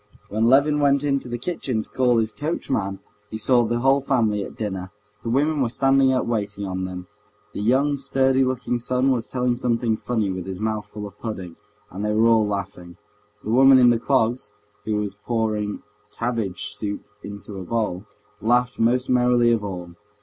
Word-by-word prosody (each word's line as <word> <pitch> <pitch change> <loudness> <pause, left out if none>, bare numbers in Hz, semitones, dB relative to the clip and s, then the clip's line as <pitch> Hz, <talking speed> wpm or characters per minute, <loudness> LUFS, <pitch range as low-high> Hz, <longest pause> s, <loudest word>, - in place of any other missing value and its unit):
When 110 +2 0
Levin 140 +4 +4
went 140 -1 +3
into 140 -3 -1
the 120 - -3
kitchen 125 -5 -3
to - - -18
call 125 -2 +2
his 110 -1 +1
coachman 105 - -3 0.3
he 110 - -5
saw 120 +2 +4
the 120 +1 -1
whole 135 +2 +4
family 110 -7 +1
at - - -9
dinner. 95 -4 -4 0.3
The 115 - -4
women 145 +4 +1
were 125 - +1
standing 135 +2 +3
up 130 - +1
waiting 105 -3 -2
on 95 -1 -3
them. 90 -1 -6 0.5
The - - -4
young, 135 +6 +2
sturdy 135 -1 +2
looking 125 -1 -1
son 125 +2 +1
was 120 -3 -1
telling 125 -1 0
something 115 -2 0
funny 110 -5 -1
with 95 0 -5
his 95 -1 -5
mouth 110 -1 -2
full 105 0 -7
of 100 - -11
pudding, 95 -7 -6 0.4
and 95 +3 -5
they 105 0 0
were 110 +1 +4
all 115 -2 +4
laughing, 90 -4 -5 0.5
the 110 - -3
woman 135 +2 +7
in 125 -1 +6
the 115 - +1
clogs, 120 -2 0 0.3
who 110 - -1
was 105 -2 -2
pouring 105 -1 -2 0.3
cabbage 115 -5 -3
soup 105 -1 -4 0.2
into 100 0 -8
a - - -6
bowl, 105 -2 -2 0.4
laughing 120 +1 +2
most 125 +2 +2
merrily 125 -1 +3
of 115 -3 +1
all. 90 -3 -6
115 Hz, 185 wpm, -23 LUFS, 105-130 Hz, 0.5 s, woman